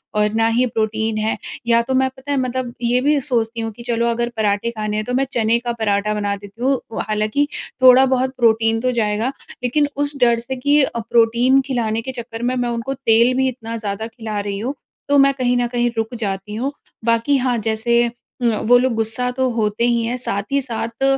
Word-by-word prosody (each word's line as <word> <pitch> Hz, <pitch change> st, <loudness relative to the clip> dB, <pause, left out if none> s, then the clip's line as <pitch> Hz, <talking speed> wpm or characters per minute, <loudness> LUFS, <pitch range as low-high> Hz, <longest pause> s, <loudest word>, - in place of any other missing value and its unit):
और 210 Hz, 0 st, +3 dB
ना 225 Hz, 0 st, +2 dB
ही 250 Hz, -, +4 dB
प्रोटीन 220 Hz, -1 st, -1 dB
है।" 215 Hz, +1 st, -1 dB, 0.3 s
या 235 Hz, 0 st, +4 dB
तो 250 Hz, +3 st, -3 dB
मैं, 265 Hz, 0 st, +2 dB
पता 270 Hz, +2 st, -6 dB
है, 285 Hz, -, +1 dB
मतलब 255 Hz, -1 st, -2 dB
ये 245 Hz, +1 st, +2 dB
भी 290 Hz, +2 st, +3 dB
सोचती 235 Hz, -4 st, -1 dB
हूँ 225 Hz, 0 st, -3 dB
कि 235 Hz, -, -8 dB
चलो, 235 Hz, 0 st, 0 dB
अगर 235 Hz, 0 st, 0 dB
पराठे 210 Hz, +1 st, 0 dB
खाने 215 Hz, -2 st, -3 dB
हैं, 215 Hz, -, -2 dB
तो 250 Hz, -, -3 dB
मैं 265 Hz, +2 st, +2 dB
चने 230 Hz, -2 st, +2 dB
का 240 Hz, 0 st, -3 dB
पराठा 210 Hz, -1 st, +1 dB
बना 205 Hz, -1 st, -1 dB
देती 205 Hz, +3 st, -13 dB
हूँ। 265 Hz, 0 st, +2 dB, 0.3 s
हालाँकि 215 Hz, +7 st, 0 dB, 0.3 s
थोड़ा 255 Hz, +1 st, +8 dB
बहुत 260 Hz, 0 st, 0 dB
प्रोटीन 225 Hz, -1 st, +3 dB
तो 255 Hz, +2 st, 0 dB
जाएगा, 220 Hz, +1 st, 0 dB, 0.3 s
लेकिन 290 Hz, +4 st, +2 dB
उस 290 Hz, +1 st, -1 dB
डर 235 Hz, -1 st, +5 dB
से 265 Hz, +3 st, -5 dB
कि 285 Hz, +3 st, +3 dB
अ, 235 Hz, -, -2 dB
प्रोटीन 235 Hz, +3 st, +3 dB
खिलाने 230 Hz, -4 st, -1 dB
के 260 Hz, +3 st, -5 dB
चक्कर 235 Hz, -2 st, -7 dB
में 250 Hz, +1 st, 0 dB
मैं 245 Hz, -1 st, -1 dB
उनको 235 Hz, +3 st, -3 dB
तेल 240 Hz, -2 st, +3 dB
भी 265 Hz, 0 st, +2 dB
इतना 230 Hz, -3 st, -5 dB
ज़्यादा 215 Hz, 0 st, -4 dB
खिला 220 Hz, -2 st, -5 dB
रही 200 Hz, -1 st, -3 dB
हूँ, 250 Hz, +6 st, -2 dB, 0.4 s
तो 285 Hz, -, +4 dB
मैं 275 Hz, 0 st, +5 dB
कहीं 250 Hz, -2 st, 0 dB
न 245 Hz, -, +1 dB
कहीं 240 Hz, 0 st, 0 dB
रुक 225 Hz, +2 st, -2 dB
जाती 200 Hz, -1 st, -4 dB
हूँ। 260 Hz, +5 st, -2 dB, 0.3 s
बाकी, 230 Hz, +4 st, +2 dB
हाँ, 250 Hz, -2 st, 0 dB
जैसे 230 Hz, +2 st, +1 dB, 0.3 s
न 230 Hz, -2 st, +3 dB
वो 245 Hz, +1 st, +7 dB
लोग 255 Hz, 0 st, +1 dB
गुस्सा 225 Hz, +3 st, -1 dB
तो 260 Hz, +1 st, 0 dB
होते 220 Hz, -2 st, -1 dB
ही 235 Hz, -1 st, +2 dB
हैं, 240 Hz, +2 st, -1 dB
साथ 200 Hz, -5 st, -3 dB
ही 280 Hz, -, +3 dB
साथ 230 Hz, 0 st, -4 dB
235 Hz, 220 wpm, -20 LUFS, 220-255 Hz, 0.4 s, थोड़ा